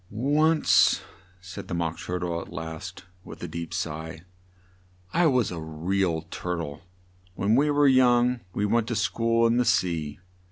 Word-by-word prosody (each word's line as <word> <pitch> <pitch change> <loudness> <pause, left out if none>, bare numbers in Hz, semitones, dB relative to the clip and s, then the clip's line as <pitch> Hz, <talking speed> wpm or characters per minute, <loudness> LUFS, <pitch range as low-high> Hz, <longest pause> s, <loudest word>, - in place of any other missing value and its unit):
"Once," 150 +8 +3 0.4
said 95 +1 -9
the 85 - -3
Mock 85 -1 -2
Tur 90 - -3
tle 85 -2 -3
at - - -11
last, 80 +3 -7 0.2
with - - -11
a - - -3
deep 85 -1 -6
sigh, 80 -2 -5 0.9
"I 175 -1 +4
was 125 -8 +2
a 85 - -5
re 80 +5 -2
al 80 -3 -1
Tur 90 0 -3
tle. 75 -4 -6 0.5
When 105 +4 +2
we 145 +4 +3
were 145 0 +4
young 125 -1 +4
we 100 +3 -1
went 115 +2 +1
to 120 - -2
school 115 +2 +1
in 115 +1 +3
the 125 - +3
sea. 85 -8 0
95 Hz, 170 wpm, -26 LUFS, 85-120 Hz, 0.9 s, I